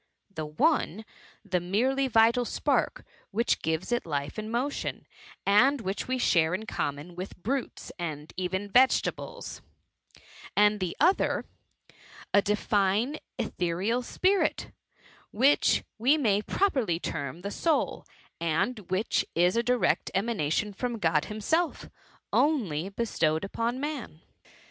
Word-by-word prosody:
The 155 -4 -4
one, 220 - +1 0.4
the 185 -3 0
merely 250 +10 +1
vital 230 +1 +4
spark - - 0 0.2
which 230 +4 0
gives 160 +6 -2
it 240 - +1
life 145 +3 -3
and 215 +1 -5
mo* 245 +4 +1
tion, - - -5 0.4
and 250 +8 +5
which 195 -1 -3
we 260 0 0
share 170 -8 +3
in 215 +3 -5
conmion 145 -3 -3
with 185 +3 -7
brutes, 250 +8 -3
and 155 -3 -5
even 190 +2 -2
vegetables; 260 - +1 1.0
and 210 0 +5
the 185 -3 -3
other, 375 +3 +2 0.9
the 205 - +6
divine 210 +5 +1 0.2
ethereal 205 +1 -1
spirit,«which 290 - 0 0.2
we 265 +7 +4
may 210 -8 +2
pro 400 - +1
perly 210 - 0
term 145 -1 -4
the 200 +2 -4
soul, 320 +5 0 0.4
and 170 +9 0
which 190 +4 +1
is 175 +3 +3
a 235 - +3
direct 245 0 +1
ema 230 +4 0
nation 200 +3 -1
from 240 +3 -3
God 165 -6 +1
himself, 310 +11 -1 0.4
only 195 - +1
bestowed 170 -7 0
upon 230 +5 -2
man. 280 - -5
210 Hz, 125 wpm, -28 LUFS, 175-250 Hz, 1.0 s, the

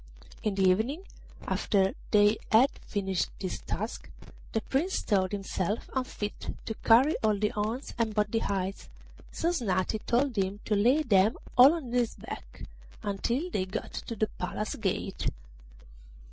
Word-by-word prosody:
In 210 -2 -1
the 195 - +1
evening, 230 - +1 0.4
after 195 -2 +2 0.2
they 210 +1 +5
had 240 +5 +6 0.2
finished 195 -3 -1
this 185 -2 -3
task, 215 +5 -5 0.4
the 225 - 0
Prince 320 +12 0
thought 190 -3 +1
himself 200 0 -2
unfit 250 -5 -4
to 220 - -2
carry 255 +7 +6
all 215 -1 +3
the 210 +1 +1
horns 220 +6 -3
and 220 -2 0
both 210 -1 +1
the 225 - +2
hides, 195 -2 -3 0.4
so 335 - 0
Snati 215 - 0
told 250 +1 +2
him 195 0 -1
to 215 - 0
lay 250 +10 +4
them 205 -4 +4 0.2
all 260 +5 +9
on 275 -8 -6
his 245 -2 +1
back - - -9 0.4
until 235 - -1
they 185 - 0
got 185 - -5
to 230 - -5
the 215 - +2
Palace 210 +4 -3
gate. 195 -2 -2
215 Hz, 150 wpm, -29 LUFS, 195-245 Hz, 0.4 s, all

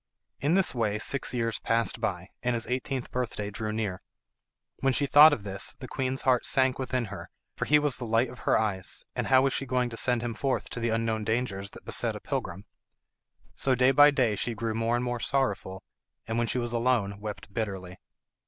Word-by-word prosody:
In 145 +6 +2
this 195 -1 +4
way 110 -4 0
six 140 +5 -1
years 115 -2 -1
passed 115 0 0
by, 95 -4 -2
and 125 -1 0
his 115 - -1
eighteenth 130 +1 -3
birthday 110 -5 -3
drew 105 +2 -3
near. 110 -4 -3 0.8
When 135 -1 +2
she 140 - +2
thought 150 +3 +8
of 120 -8 -2
this 95 -1 -2
the 130 - -8
queen's 130 +1 -2
heart 125 -2 +3
sank 130 -2 +2
within 130 -2 -1
her, - - -8 0.3
for - - -2
he 150 - +5
was 150 -3 0
the 120 - -5
light 115 +3 +2
of 120 +1 -11
her - - +2
eyes 100 -4 -2
and - - -2
how 130 -1 +5
was 135 - +1
she 135 - -2
to 125 -2 0
send 120 -1 +1
him 120 -1 -2
forth 135 +3 -2
to - - -4
the 115 0 0
unknown 115 -1 0
dangers 105 -3 -2
that - - -16
beset - - 0
a - - -6
pilgrim? 95 +4 -4 0.9
So 130 -1 +2
day 130 +1 +4
by 145 +2 +7
day 130 -7 +1
she 115 +3 -2
grew 110 +1 -2
more 115 +1 0
and 120 +1 -1
more 120 -1 -2
sorrowful, 105 -8 -1 0.4
and 115 +1 -2
when 120 - +1
she - - -1
was 120 -1 -2
alone 115 -5 +1
wept 105 -1 -7
bitterly. 95 -5 -4
120 Hz, 210 wpm, -28 LUFS, 110-130 Hz, 0.9 s, thought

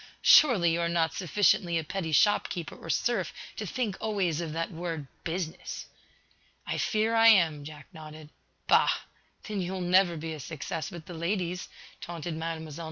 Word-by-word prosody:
"Surely, 205 - +6
you 170 - 0
are 170 - 0
not 165 -1 +1
sufficiently 180 -1 +2
a 160 - -1
petty 165 +1 -4
shop 205 +8 +3
keeper 170 -4 -5
or 165 - -11
serf 190 - 0 0.2
to 210 - -5
think 225 -2 -2
always 190 -7 0
of 165 -2 -4
that 165 +4 -3
word, 165 -3 -4 0.2
'business!'" 165 -1 -4 0.8
"I - - -3
fear 220 +1 +1
I 225 0 +6
am," 165 -9 +5
Jack 150 0 -10
nodded. 155 -1 -11 0.3
"Bah! - - +5 0.5
Then 210 -3 -3
you 180 +1 -3
will 190 - -4
never 180 -1 +3
be 160 +1 -5
a 155 - -7
success 160 +4 -5
with 170 -5 -10
the 175 - -9
ladies," 180 +1 -2 0.3
taunted 170 0 -5
Mlle. 160 -1 -4
170 Hz, 170 wpm, -28 LUFS, 160-190 Hz, 0.8 s, Surely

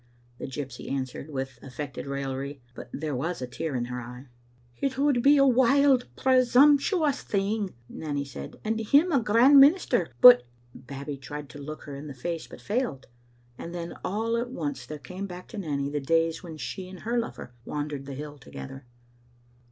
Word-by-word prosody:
the - - -5
gypsy 130 -2 -6
answered, 135 +2 -4
with 135 -2 -5
affected 140 +2 -7
raillery, 140 0 -4
but - - -10
there 150 -2 -3
was 165 +8 -2
a 130 - -3
tear 135 +4 -4
in 120 -1 -1
her 125 0 -5
eye. 125 +2 -9 0.5
"It 270 -1 -1
would 275 -3 +3
be 285 +3 +6
a 275 - +6
wild, 260 +1 +4
presumptions 280 - +4
thing," 200 - -1
Nanny 145 -1 -4
said, 70 - -9
" - - -29
and 220 +1 0
him 285 +11 +4
a 280 - +4
grand 235 +7 +6
minister, 275 - +5
but 125 0 +10 0.2
" 120 - -32
Babbie 140 +2 -7
tried 145 +1 -8
to 145 - -10
look 155 +2 -7
her 145 - -8
in 140 +2 -8
the 140 - -8
face, 165 +6 -4
but - - -12
failed, 210 - -2 0.5
and 170 +1 -7
then 170 -1 -5
all 225 +4 -1
at 240 +1 -2
once 145 - -4
there 150 - -6
came 185 +6 -7
back 180 -1 -9
to 215 - -6
Nanny 145 -6 -2
the 145 +1 -2
days 165 +3 +1
when 165 -4 -9
she 185 +4 -6
and 185 -1 -11
her 235 +2 0
lover 230 - -6
wandered 145 -1 -4
the 140 - -6
hill 145 +1 -8
together. 135 0 -10
155 Hz, 190 wpm, -27 LUFS, -, 0.5 s, but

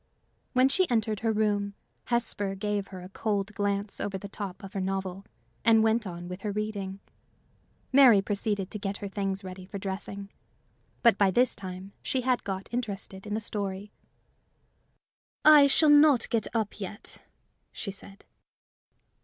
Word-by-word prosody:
When 255 0 +5
she 365 +5 +2
entered 220 -3 +1
her 225 +1 +1
room, 205 -2 0 0.3
Hesper 205 -5 0
gave 205 0 -2
her 185 -2 -9
a 180 - -10
cold 205 0 -2
glance 200 0 -2
over 195 -1 -2
the 200 - -8
top 200 -2 -7
of 195 - -9
her 195 - -2
novel, 190 0 -3 0.4
and 225 -1 +5
went 220 -1 +2
on 175 -1 -7
with 180 +2 -7
her 210 - -2
reading. 200 -2 -4 0.9
Mary 260 -6 +8
proceeded 200 -1 -1
to 210 - -5
get 200 0 -3
her 200 - -5
things 195 0 -3
ready 185 0 -8
for 195 +2 -7
dressing. 200 +1 -5 0.7
But 230 -5 +5
by 200 -2 +5
this 245 +6 +3
time 190 0 -8
she 260 - -1
had 250 0 +1
got 190 -1 -4
interested 200 -4 -4
in 210 - -2
the - - 0
story. 205 -1 -4 1.5
"I 300 -2 +9
shall 300 +2 +5
not 290 -4 +6
get 225 -3 +1
up 220 -2 -1
yet," 200 +2 -7 0.5
she 200 - -5
said. 195 0 -12
205 Hz, 160 wpm, -28 LUFS, 195-220 Hz, 1.5 s, I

